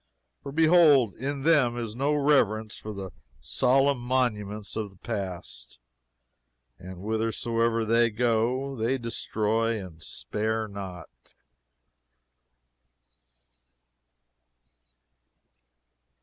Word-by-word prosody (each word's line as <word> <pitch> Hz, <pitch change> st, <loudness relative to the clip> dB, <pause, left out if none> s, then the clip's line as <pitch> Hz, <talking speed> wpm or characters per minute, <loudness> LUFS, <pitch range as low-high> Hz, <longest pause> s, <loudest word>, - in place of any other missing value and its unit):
For 140 Hz, -, -7 dB
behold 155 Hz, -, +5 dB
in 140 Hz, +2 st, -3 dB
them 140 Hz, -7 st, +3 dB
is 115 Hz, -2 st, -4 dB
no 140 Hz, +4 st, +1 dB
reverence 110 Hz, -7 st, +2 dB
for 110 Hz, -, -7 dB
the 95 Hz, -2 st, -7 dB, 0.3 s
solemn 130 Hz, -, +2 dB
monuments 110 Hz, -5 st, -2 dB
of 110 Hz, -2 st, -3 dB
the 95 Hz, -, -21 dB
past, 95 Hz, -, -6 dB, 1.0 s
and 95 Hz, 0 st, -9 dB
whithersoever 115 Hz, +1 st, 0 dB
they 115 Hz, +1 st, +3 dB
go 120 Hz, +4 st, 0 dB
they 120 Hz, +3 st, 0 dB
destroy 115 Hz, -1 st, -1 dB
and 90 Hz, -5 st, -10 dB
spare 110 Hz, +5 st, -3 dB
not. 95 Hz, -4 st, -8 dB
115 Hz, 85 wpm, -27 LUFS, 105-130 Hz, 1.0 s, behold